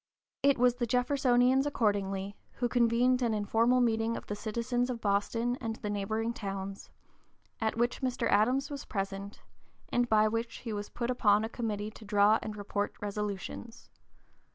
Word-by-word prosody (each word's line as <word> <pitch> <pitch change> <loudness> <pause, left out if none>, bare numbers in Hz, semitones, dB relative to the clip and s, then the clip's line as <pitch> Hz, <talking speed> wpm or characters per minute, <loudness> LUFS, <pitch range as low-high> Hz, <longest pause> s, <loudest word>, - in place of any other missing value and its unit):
It 280 0 +4
was 245 0 +3
the 240 -2 -1
Jeffersonians, 250 +1 +3
accordingly, 200 -6 -1 0.2
who 245 - -1
convened 245 +1 +3
"an 230 -3 +1
informal 225 +4 +2
meeting 225 -1 +1
of - - -8
the 205 - -4
citizens 235 +3 -1
of 245 -2 -3
Boston 230 +4 0
and 225 -2 -3
the 210 -2 -4
neighboring 220 +3 -1
towns," 195 -2 -6 0.7
at 220 0 -1
which 240 +3 0
Mr. 255 -2 0
Adams 255 +8 +2
was 285 0 -5
present, 195 -1 -5 0.5
and 245 0 +1
by 215 0 +5
which 230 +1 -2
he 225 - -3
was 205 0 -4
put 240 0 -2
upon 210 -4 +3
a - - -5
committee 215 -3 -3
to 220 - -13
draw 210 +1 +4
and 215 -1 -6
report 205 0 -3
resolutions. 210 +3 -5
225 Hz, 160 wpm, -30 LUFS, 205-245 Hz, 0.7 s, by